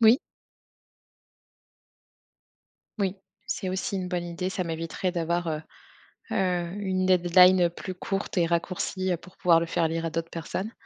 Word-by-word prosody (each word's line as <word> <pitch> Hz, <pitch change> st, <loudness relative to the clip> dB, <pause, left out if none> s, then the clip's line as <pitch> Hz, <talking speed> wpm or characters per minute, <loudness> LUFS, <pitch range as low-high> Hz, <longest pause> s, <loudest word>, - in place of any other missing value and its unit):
Moui. 230 Hz, +4 st, +7 dB, 2.8 s
Moui, 195 Hz, -1 st, 0 dB, 0.3 s
c'est 185 Hz, -, -2 dB
aussi 185 Hz, +2 st, -2 dB
une 185 Hz, -1 st, -3 dB
bonne 180 Hz, -1 st, -2 dB
idée. 175 Hz, +2 st, -3 dB
Ça 185 Hz, -1 st, -2 dB
m'éviterait 165 Hz, +2 st, -2 dB
d'avoir, 170 Hz, 0 st, -1 dB
heu 155 Hz, 0 st, -2 dB, 0.7 s
heu, 180 Hz, -3 st, 0 dB
une 185 Hz, -1 st, 0 dB
deadline 180 Hz, 0 st, +6 dB
plus 185 Hz, +2 st, -6 dB
courte 195 Hz, +1 st, -3 dB
et 170 Hz, -, +4 dB
raccourcie, 185 Hz, +2 st, -1 dB
heu, -, -, +1 dB
pour 180 Hz, +2 st, -16 dB
pouvoir 170 Hz, -2 st, +5 dB
le 170 Hz, -, -1 dB
faire 165 Hz, 0 st, +1 dB
lire 165 Hz, +1 st, -2 dB
à 165 Hz, -, -1 dB
d'autres 165 Hz, +1 st, -3 dB
personnes. 185 Hz, +6 st, -4 dB
180 Hz, 150 wpm, -27 LUFS, 170-185 Hz, 2.8 s, Moui